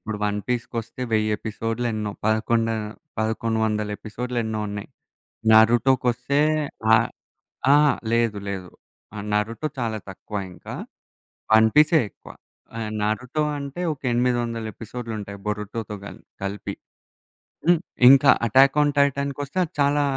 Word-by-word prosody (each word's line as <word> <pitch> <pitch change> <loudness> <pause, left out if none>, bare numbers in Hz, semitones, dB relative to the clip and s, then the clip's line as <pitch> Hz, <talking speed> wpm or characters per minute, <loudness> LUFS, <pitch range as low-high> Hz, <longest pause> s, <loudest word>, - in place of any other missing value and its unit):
ఇప్పుడు 105 -1 -5
'one 105 0 0
piece' 125 -2 -1
కొస్తే 115 +2 -4
1000 110 0 +2
ఎపిసోడ్లు 115 +2 -3
ఎన్నో. 105 -1 -2 0.2
పదకొండ 115 +1 +2 0.5
పదకొండు 110 +1 0
వందల 105 -1 -1
ఎపిసోడ్లు 125 +3 -4
ఎన్నో 110 -1 -2
ఉన్నాయి. 100 0 -6 0.6
'నరుటో' 115 +4 +6
కొస్తే 125 +4 +1 0.5
ఆ - - +8 0.8
అహా! 150 0 +6 0.2
లేదు 115 -3 +2
లేదు. 95 -2 -5 0.4
ఆ! - - -8 0.2
'నరుటో' 115 +8 -1
చాలా 115 -3 -1
తక్కువ 105 +2 -8 0.2
ఇంకా. - - -9 0.8
'వన్ 110 0 +7
పీసే' 155 +1 +6
ఎక్కువ. - - -14 0.5
ఆ! - - -3 0.2
'నరుటో' 125 +8 -1
అంటే, 140 +4 -6
ఒక 145 - -17
800 120 -2 0
ఎపిసోడ్లుంటయి 110 -3 -7
'బొరుటోతో' 105 0 -4
గల్ - - -9 0.2
గలిపి. 100 +1 -4 0.9
హ్మ్. 175 0 +5 0.3
ఇంకా 135 +1 +8 0.2
'అటాక్ 135 +5 +5
ఆన్ 145 0 +2
టైటాన్' 140 0 +2
కొస్తే 145 +5 -4
అది 160 - -10
చాలా 145 +1 +3
115 Hz, 130 wpm, -24 LUFS, 110-135 Hz, 0.9 s, ఆ